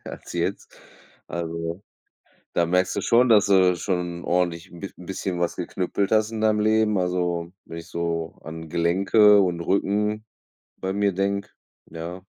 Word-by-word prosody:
als -, -, -9 dB
jetzt. -, -, -3 dB, 0.5 s
Also, 85 Hz, +1 st, -4 dB, 0.7 s
da 85 Hz, -, +2 dB
merkst 90 Hz, +2 st, +1 dB
du -, -, +1 dB
schon, 125 Hz, +2 st, +4 dB
dass 105 Hz, -3 st, +5 dB
du 95 Hz, -2 st, +4 dB
schon 90 Hz, -1 st, -3 dB
ordentlich 90 Hz, 0 st, -1 dB
'n 85 Hz, -, -11 dB
b 100 Hz, -, -6 dB
bisschen 90 Hz, 0 st, -4 dB
was 85 Hz, 0 st, 0 dB
geknüppelt 95 Hz, +1 st, -2 dB
hast 110 Hz, 0 st, +2 dB
in 110 Hz, -, -4 dB
deinem 110 Hz, -1 st, +3 dB
Leben. 110 Hz, -1 st, +2 dB
Also, 90 Hz, -1 st, -1 dB
wenn 85 Hz, -, -8 dB
ich 85 Hz, -, -9 dB
so 85 Hz, -1 st, -3 dB
an 80 Hz, 0 st, -8 dB
Gelenke 100 Hz, +5 st, +4 dB
und 90 Hz, -3 st, 0 dB
Rücken 105 Hz, +4 st, 0 dB, 0.5 s
bei 95 Hz, 0 st, -3 dB
mir 100 Hz, 0 st, +1 dB
denke, 100 Hz, +2 st, -1 dB, 0.4 s
ja. 85 Hz, +3 st, -7 dB
90 Hz, 155 wpm, -24 LUFS, 85-100 Hz, 0.7 s, dass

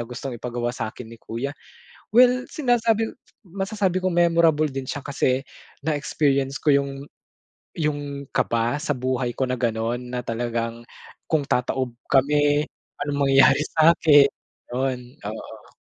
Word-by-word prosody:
gustong 125 Hz, +3 st, -6 dB
ipagawa 120 Hz, 0 st, -3 dB
sa'kin 125 Hz, 0 st, -6 dB
ni 115 Hz, 0 st, -13 dB
kuya. 125 Hz, +5 st, -4 dB, 0.6 s
Well, 250 Hz, +1 st, +5 dB
sinasabi 230 Hz, -6 st, 0 dB, 0.2 s
masasabi 195 Hz, -1 st, -2 dB
kong 185 Hz, -, +1 dB
memorable 165 Hz, -3 st, +3 dB
din 135 Hz, -1 st, -5 dB
siya 145 Hz, -, -4 dB
kasi 135 Hz, -1 st, -1 dB, 0.3 s
na-experience 140 Hz, -2 st, 0 dB
ko 145 Hz, -3 st, +4 dB
yung 140 Hz, 0 st, 0 dB, 0.9 s
yung 145 Hz, -3 st, -3 dB
kaba 120 Hz, +5 st, 0 dB
sa 145 Hz, -4 st, -1 dB
buhay 125 Hz, -1 st, -2 dB
ko 130 Hz, -, +1 dB
na 125 Hz, -1 st, -3 dB
gano'n, 120 Hz, +1 st, -1 dB
na 125 Hz, 0 st, -4 dB
talagang 115 Hz, 0 st, -3 dB, 0.4 s
kung 155 Hz, -3 st, +1 dB
tataob 125 Hz, -1 st, -1 dB, 0.2 s
kami, 145 Hz, +2 st, +3 dB, 0.4 s
anong 145 Hz, -1 st, -2 dB
mangyayari 135 Hz, +1 st, +6 dB, 0.2 s
sa'kin? 155 Hz, -3 st, +6 dB, 0.5 s
Yun, 125 Hz, +1 st, -3 dB
oo. 110 Hz, +1 st, -9 dB
140 Hz, 125 wpm, -23 LUFS, 125-155 Hz, 0.9 s, mangyayari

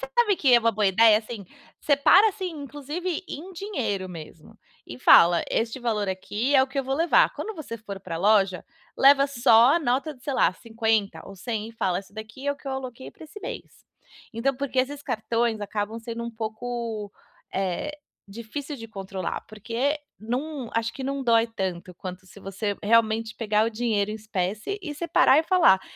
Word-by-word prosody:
sabe 405 Hz, -, +1 dB
que 260 Hz, -5 st, +4 dB
é -, -, +8 dB
uma 230 Hz, 0 st, +2 dB
boa 210 Hz, -1 st, +1 dB
ideia, 215 Hz, +2 st, +6 dB
assim, 220 Hz, -2 st, -8 dB, 0.4 s
separa, 305 Hz, +9 st, +5 dB
assim, 380 Hz, -3 st, -4 dB
inclusive 300 Hz, +6 st, -4 dB
em 360 Hz, +6 st, -7 dB
dinheiro 235 Hz, -, -3 dB
mesmo 160 Hz, -2 st, -11 dB, 0.3 s
e 120 Hz, -, -9 dB
fala: 170 Hz, +5 st, +6 dB
"Este 230 Hz, +3 st, -1 dB
valor 215 Hz, -5 st, -1 dB
aqui 210 Hz, +8 st, -2 dB
é 265 Hz, -, +7 dB
o -, -, 0 dB
que 275 Hz, +1 st, -5 dB
eu 270 Hz, -, 0 dB
vou 270 Hz, -, -1 dB
levar". 330 Hz, +3 st, +3 dB
Quando 440 Hz, -, -5 dB
você 280 Hz, -7 st, -7 dB
for 200 Hz, -3 st, -8 dB
pra 170 Hz, -3 st, -5 dB
loja, 195 Hz, 0 st, +2 dB, 0.3 s
leva 275 Hz, +1 st, +6 dB
só 240 Hz, 0 st, +5 dB
a -, -, +3 dB
nota 280 Hz, +1 st, -1 dB
de, 250 Hz, -, -23 dB
sei 285 Hz, -, -2 dB
lá, -, -, +3 dB
50 225 Hz, -3 st, -1 dB
ou 195 Hz, -, -11 dB
100, 220 Hz, +2 st, -4 dB
e -, -, -12 dB
fala: 185 Hz, -5 st, -1 dB
"Isso 200 Hz, +1 st, -12 dB
daqui 220 Hz, +6 st, -9 dB
é 285 Hz, -, +2 dB
o -, -, -12 dB
que 275 Hz, -, -18 dB
eu 270 Hz, -, -2 dB
aloquei 260 Hz, -1 st, -6 dB
pra -, -, -14 dB
esse 310 Hz, +7 st, -11 dB
mês". -, -, -8 dB, 0.5 s
Então 255 Hz, +4 st, 0 dB
porque 275 Hz, -1 st, -3 dB
esses 280 Hz, +2 st, 0 dB
cartões 230 Hz, -1 st, -1 dB
acabam 205 Hz, +2 st, -3 dB
sendo 230 Hz, 0 st, -6 dB
um 235 Hz, -, -4 dB
pouco, 220 Hz, -1 st, -5 dB, 0.4 s
eh, 195 Hz, +11 st, -2 dB, 0.3 s
difícil 270 Hz, +7 st, -6 dB
de 230 Hz, -1 st, -9 dB
controlar, 195 Hz, -3 st, -5 dB
porque 235 Hz, +7 st, -2 dB, 0.2 s
não 255 Hz, +3 st, -4 dB
acho 230 Hz, +1 st, 0 dB
que 270 Hz, -, -7 dB
não 275 Hz, +1 st, -2 dB
dói 230 Hz, -1 st, +4 dB
tanto 185 Hz, -4 st, -5 dB
quanto 185 Hz, +1 st, -8 dB
se 190 Hz, -, -15 dB
você 195 Hz, +1 st, -3 dB
realmente 220 Hz, 0 st, +2 dB
pegar 215 Hz, -1 st, +1 dB
o -, -, -1 dB
dinheiro 215 Hz, -3 st, 0 dB
em -, -, -4 dB
espécie 215 Hz, -, -3 dB
e 300 Hz, -5 st, -5 dB
separar 300 Hz, -3 st, +4 dB
e 315 Hz, -, +3 dB
falar: 325 Hz, -, +5 dB
230 Hz, 190 wpm, -25 LUFS, 210-275 Hz, 0.5 s, é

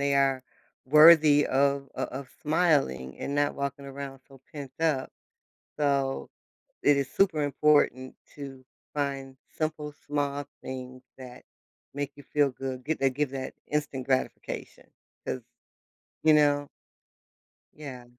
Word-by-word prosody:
they 140 Hz, 0 st, +2 dB
are 135 Hz, -1 st, +2 dB, 0.4 s
worthy 150 Hz, 0 st, +8 dB
of 140 Hz, +1 st, +1 dB
o -, -, -1 dB
of 135 Hz, 0 st, -7 dB
smiling 145 Hz, -, +1 dB
and 140 Hz, -, -3 dB
not 145 Hz, 0 st, +1 dB
walking 140 Hz, 0 st, -4 dB
around 135 Hz, -1 st, -7 dB
so 135 Hz, -2 st, -16 dB
pent 140 Hz, -3 st, -7 dB
up. 155 Hz, -5 st, +1 dB, 0.7 s
So, 140 Hz, -2 st, 0 dB, 0.5 s
it 145 Hz, -1 st, +5 dB
is 140 Hz, -1 st, 0 dB
super 175 Hz, -6 st, +2 dB
important 145 Hz, -3 st, +2 dB, 0.2 s
to 135 Hz, -2 st, -9 dB, 0.3 s
find 135 Hz, -2 st, -3 dB, 0.2 s
simple, 155 Hz, -2 st, -3 dB
small 145 Hz, -1 st, -1 dB, 0.2 s
things 130 Hz, -1 st, -7 dB, 0.2 s
that 125 Hz, -1 st, -11 dB, 0.5 s
make 145 Hz, 0 st, -3 dB
you 145 Hz, -, -12 dB
feel 145 Hz, -1 st, +2 dB
good, 130 Hz, -1 st, -6 dB
get 160 Hz, -, -2 dB
that 135 Hz, -1 st, +3 dB
give 145 Hz, 0 st, 0 dB
that 135 Hz, -1 st, -5 dB
instant 145 Hz, -3 st, -2 dB
gratification 130 Hz, -1 st, -3 dB, 0.4 s
'cause -, -, -3 dB, 0.8 s
you 155 Hz, -1 st, +7 dB
know? 145 Hz, -1 st, +3 dB, 1.1 s
Yeah. 135 Hz, -5 st, -9 dB
140 Hz, 130 wpm, -28 LUFS, 135-145 Hz, 1.1 s, worthy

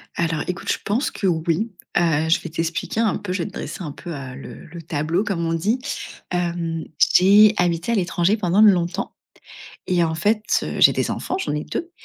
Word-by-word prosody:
Alors, 165 Hz, -2 st, -1 dB
écoute, 180 Hz, +1 st, -2 dB
je -, -, 0 dB
pense 230 Hz, +8 st, 0 dB
que 195 Hz, -, -2 dB
oui. 170 Hz, +6 st, 0 dB, 0.3 s
Heu, 160 Hz, -2 st, +2 dB
je 165 Hz, -, +3 dB
vais 170 Hz, -, -7 dB
t'expliquer 165 Hz, +6 st, -3 dB
un 225 Hz, -4 st, +2 dB
peu, 195 Hz, -, -6 dB
je 185 Hz, -, -2 dB
vais -, -, -4 dB
te 200 Hz, -, -11 dB
dresser -, -, -6 dB
un 155 Hz, -5 st, -5 dB
peu, 175 Hz, -, -9 dB
heu, 135 Hz, -3 st, -7 dB
le 135 Hz, -, -10 dB
le 170 Hz, +2 st, -10 dB
tableau, 160 Hz, +4 st, -1 dB
comme 185 Hz, -6 st, -2 dB
on 165 Hz, -, 0 dB
dit. 205 Hz, +10 st, 0 dB, 0.5 s
Hem, 170 Hz, -2 st, -2 dB, 0.3 s
j'ai 205 Hz, +3 st, +7 dB
habité 175 Hz, +3 st, 0 dB
à -, -, +2 dB
l'étranger 180 Hz, 0 st, +1 dB
pendant 190 Hz, 0 st, +2 dB
longtemps 190 Hz, -2 st, +3 dB, 0.7 s
et 180 Hz, -2 st, +2 dB
en 160 Hz, -1 st, -1 dB
fait, 210 Hz, +7 st, +1 dB, 0.2 s
heu, -, -, -4 dB
j'ai -, -, +7 dB
des -, -, -1 dB
enfants, -, -, -3 dB
j'en -, -, -2 dB
ai 150 Hz, -, -3 dB
2 345 Hz, 0 st, -5 dB
175 Hz, 210 wpm, -22 LUFS, 165-200 Hz, 0.7 s, j'ai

